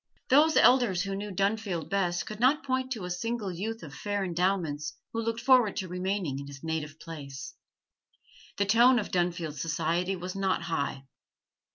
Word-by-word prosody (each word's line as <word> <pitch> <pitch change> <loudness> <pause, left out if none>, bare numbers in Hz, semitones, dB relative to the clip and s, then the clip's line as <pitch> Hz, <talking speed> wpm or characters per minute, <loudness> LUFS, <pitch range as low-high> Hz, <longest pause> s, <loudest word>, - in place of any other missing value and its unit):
Those 305 +4 +5
elders 240 -8 +5
who 195 -1 -3
knew 205 +1 -4
Dunfield 195 -4 -1
best 180 -3 0
could 215 0 -7
not 265 +5 +3
point 260 -1 -1
to 210 -6 -6
a 180 - -4
single 215 +2 -2
youth 220 +6 -4
of 145 -4 -9
fair 205 +3 -2
endowments 175 -4 -1 0.2
who 230 - -1
looked 230 0 -2
forward 250 -5 +5
to 185 - -3
remaining 180 -5 -2
in 140 - -7
his 140 0 -11
native 160 -1 -3
place. 145 -3 -8 1.0
The 200 - +2
tone 240 +5 +6
of 215 - -2
Dunfield 170 -4 -1
society 165 +4 0
was 180 +1 -6
not 190 -3 0
high. 140 -5 -2
190 Hz, 170 wpm, -29 LUFS, 165-220 Hz, 1.0 s, tone